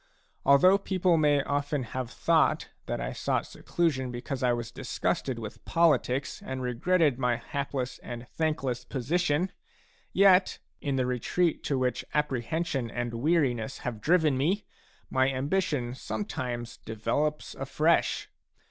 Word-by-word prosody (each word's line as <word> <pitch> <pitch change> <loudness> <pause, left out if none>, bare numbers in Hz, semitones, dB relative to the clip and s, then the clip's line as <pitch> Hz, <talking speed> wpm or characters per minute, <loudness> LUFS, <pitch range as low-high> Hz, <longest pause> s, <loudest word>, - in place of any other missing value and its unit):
Although 185 +8 +6
people 185 -3 +2
may 145 -3 +3
often 145 0 -1
have 125 +1 -4
thought - - +2 0.2
that - - -2
I - - -3
sought - - -1
seclusion 145 -7 -1
because 125 +2 -5
I 125 -1 +3
was 120 -1 -3
disgusted 130 +1 -2
with 110 -2 -8
politics 145 -5 +2
and 130 0 -4
regretted 140 +3 +2
my 125 -2 +2
hapless 130 +1 -4
and 120 0 -8
thankless 140 -6 -1
position, 150 +4 0
a 190 - -3 0.6
yet, 190 -1 +5 0.2
in 140 -2 -1
the 130 -1 +1
retreat 125 +7 0
to 140 - +1
which 125 -1 0
apprehension 145 -1 -1
and 120 0 -3
weariness 135 -2 +1
have 115 -4 -3
driven 155 -3 +3
me, 185 +9 +1 0.5
my 130 0 +3
ambition 140 -2 -1
sometimes 125 - -4
develops 115 +8 -2
afresh. - - +1
135 Hz, 130 wpm, -28 LUFS, 125-160 Hz, 0.6 s, Although